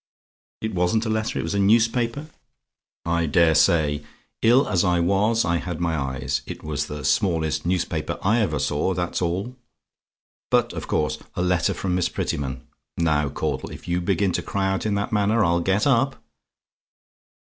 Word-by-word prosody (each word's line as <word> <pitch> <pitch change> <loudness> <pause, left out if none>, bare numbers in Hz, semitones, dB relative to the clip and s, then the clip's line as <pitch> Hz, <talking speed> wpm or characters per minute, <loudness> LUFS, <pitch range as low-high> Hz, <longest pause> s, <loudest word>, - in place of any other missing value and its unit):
"IT 110 - -3
WASN'T 90 +6 +1
A - - -2
LETTER; 110 +1 -1
IT - - -1
WAS - - -3
A 100 - 0
NEWSPAPER? 115 +6 +2 0.8
"I 85 0 +1
daresay; 75 -2 +3 0.4
ill 125 +5 +5
as 90 -4 +2
I 90 -1 +2
was, 100 +6 +2
I 85 0 +1
had 90 -2 -5
my 85 -2 0
eyes. 65 -2 -2
It - - -7
was 75 -2 -2
the 75 0 -6
smallest 80 -6 +1
newspaper 90 -1 -1
I 110 +5 +3
ever 110 - 0
saw, 80 +6 0
that's 90 0 -2
all. 95 +8 -2 0.9
But - - +2
of - - -6
course, 75 - 0 0.2
a 90 - -1
letter 90 -1 +1
from 95 -2 -2
Miss 90 0 +1
Prettyman 65 -3 -3 0.3
Now, 75 -3 +1
Caudle, 70 - -3
if - - -11
you 90 0 0
begin 95 +1 +1
to - - -1
cry 95 -1 -1
out 95 +3 -1
in 105 - 0
that 100 +3 -2
manner, 105 +2 +2
I'll 85 +1 +2
get 95 +4 +1
up. 135 0 +2
90 Hz, 170 wpm, -23 LUFS, 85-105 Hz, 0.9 s, ill